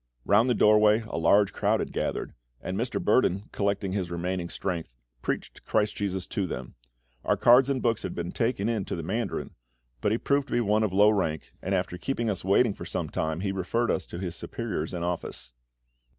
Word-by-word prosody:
Round 110 Hz, +5 st, +4 dB
the 125 Hz, -, +3 dB
doorway 105 Hz, +1 st, +5 dB
a 100 Hz, -, -3 dB
large 100 Hz, +5 st, +4 dB
crowd -, -, +1 dB
had -, -, -4 dB
gathered; -, -, -2 dB, 0.3 s
and 95 Hz, -, -4 dB
Mr. 120 Hz, +5 st, -1 dB
Burdon, 100 Hz, -6 st, +2 dB
collecting 100 Hz, -1 st, -1 dB
his 95 Hz, -3 st, -2 dB
remaining 85 Hz, 0 st, -3 dB
strength, 85 Hz, -11 st, -4 dB, 0.3 s
preached -, -, -4 dB
CHRIST 105 Hz, -1 st, +1 dB
JESUS 95 Hz, -3 st, -2 dB
to 100 Hz, -2 st, -2 dB
them. 65 Hz, -6 st, -6 dB, 0.5 s
Our -, -, +1 dB
cards 125 Hz, +3 st, +6 dB
and 135 Hz, -2 st, -1 dB
books 115 Hz, -2 st, +1 dB
had -, -, -5 dB
been 85 Hz, 0 st, -3 dB
taken 115 Hz, -3 st, 0 dB
in 115 Hz, -4 st, 0 dB
to -, -, -3 dB
the 85 Hz, -, -5 dB
mandarin, 100 Hz, 0 st, -2 dB, 0.5 s
but 105 Hz, -, +1 dB
he 110 Hz, -, +2 dB
proved 140 Hz, +2 st, +1 dB
to -, -, -6 dB
be -, -, +3 dB
one 105 Hz, 0 st, +2 dB
of 105 Hz, -3 st, +1 dB
low 105 Hz, +3 st, +6 dB
rank, 80 Hz, -, -2 dB
and 95 Hz, +1 st, 0 dB
after 90 Hz, -1 st, -2 dB
keeping 120 Hz, 0 st, -1 dB
us 95 Hz, -, -4 dB
waiting 100 Hz, +4 st, +3 dB
for -, -, -9 dB
some -, -, -3 dB
time 80 Hz, +2 st, -2 dB
he 100 Hz, -1 st, -1 dB
referred 95 Hz, +5 st, 0 dB
us 90 Hz, -, -2 dB
to -, -, -7 dB
his 90 Hz, -2 st, -4 dB
superiors 80 Hz, -1 st, -4 dB
in 85 Hz, -2 st, -4 dB
office. 85 Hz, -8 st, -4 dB
100 Hz, 210 wpm, -27 LUFS, 90-110 Hz, 0.5 s, cards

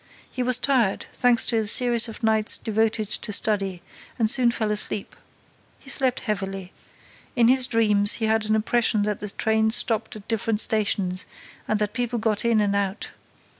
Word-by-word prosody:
He 255 Hz, -, -5 dB
was 250 Hz, 0 st, +3 dB
tired, 250 Hz, -6 st, 0 dB
thanks 245 Hz, -1 st, +3 dB
to 230 Hz, -, -1 dB
a 220 Hz, -, 0 dB
series 240 Hz, 0 st, +3 dB
of 225 Hz, +1 st, -11 dB
nights 220 Hz, -1 st, +3 dB
devoted 220 Hz, -1 st, -1 dB
to 210 Hz, -, -4 dB
study, 195 Hz, -3 st, 0 dB, 0.3 s
and 225 Hz, -3 st, +2 dB
soon 250 Hz, -3 st, +4 dB
fell 220 Hz, -2 st, -2 dB
asleep. 210 Hz, -1 st, -3 dB, 0.6 s
He 270 Hz, -, -4 dB
slept 260 Hz, -3 st, 0 dB
heavily. 195 Hz, -3 st, -5 dB, 0.6 s
In 235 Hz, -2 st, +3 dB
his 260 Hz, 0 st, +3 dB
dreams, 210 Hz, -4 st, +3 dB
he 225 Hz, -, -2 dB
had 220 Hz, 0 st, 0 dB
an 215 Hz, -, +1 dB
impression 220 Hz, -1 st, 0 dB
that 210 Hz, 0 st, -3 dB
the 210 Hz, -, -5 dB
train 220 Hz, +2 st, 0 dB
stopped 225 Hz, -1 st, 0 dB
at 205 Hz, -2 st, -12 dB
different 225 Hz, -1 st, -2 dB
stations 200 Hz, -4 st, 0 dB, 0.4 s
and 215 Hz, -, 0 dB
that 210 Hz, 0 st, -3 dB
people 240 Hz, 0 st, -3 dB
got 220 Hz, -2 st, -1 dB
in 230 Hz, -2 st, +2 dB
and 200 Hz, -1 st, 0 dB
out. 200 Hz, 0 st, -3 dB
220 Hz, 175 wpm, -23 LUFS, 210-235 Hz, 0.6 s, soon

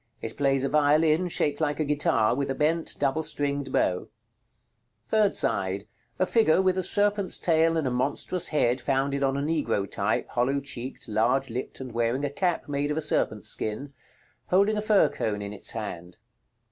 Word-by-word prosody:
It 110 Hz, -, -6 dB
plays 135 Hz, -2 st, +1 dB
a 135 Hz, -, 0 dB
violin, 155 Hz, +3 st, +3 dB
shaped 145 Hz, -2 st, 0 dB
like 150 Hz, -1 st, 0 dB
a 155 Hz, -, +1 dB
guitar, 145 Hz, -6 st, +2 dB
with 140 Hz, +2 st, -2 dB
a 135 Hz, -, -1 dB
bent 160 Hz, +3 st, +1 dB
double 140 Hz, +2 st, 0 dB
stringed 140 Hz, -3 st, -3 dB
bow. 90 Hz, -6 st, 0 dB, 1.0 s
Third 215 Hz, -2 st, +2 dB
side. 95 Hz, +1 st, 0 dB, 0.3 s
A 185 Hz, -, +2 dB
figure 185 Hz, -5 st, +3 dB
with 190 Hz, -1 st, +2 dB
a -, -, +1 dB
serpent's 205 Hz, +1 st, +2 dB
tail 165 Hz, -1 st, +2 dB
and 160 Hz, -, -1 dB
a 130 Hz, -, 0 dB
monstrous 140 Hz, +8 st, -1 dB
head, 130 Hz, -4 st, +1 dB
founded 140 Hz, +1 st, 0 dB
on 135 Hz, 0 st, +1 dB
a -, -, -1 dB
Negro 140 Hz, -10 st, -1 dB
type, 100 Hz, +2 st, -1 dB
hollow 130 Hz, +3 st, 0 dB
cheeked, 130 Hz, -2 st, -7 dB
large 115 Hz, +4 st, +1 dB
lipped, 125 Hz, +3 st, -5 dB
and 130 Hz, -2 st, -7 dB
wearing 120 Hz, +4 st, 0 dB
a 140 Hz, -, -3 dB
cap 175 Hz, +2 st, -1 dB
made 145 Hz, 0 st, -1 dB
of 150 Hz, -, -2 dB
a -, -, +2 dB
serpent's 110 Hz, -8 st, +1 dB
skin, 135 Hz, +7 st, -3 dB, 0.5 s
holding 200 Hz, +4 st, +3 dB
a 210 Hz, -, -1 dB
fir 210 Hz, -1 st, +4 dB
cone 105 Hz, -1 st, -3 dB
in 100 Hz, 0 st, -6 dB
its 105 Hz, -, -3 dB
hand. 90 Hz, -5 st, -6 dB
140 Hz, 185 wpm, -26 LUFS, 120-160 Hz, 1.0 s, fir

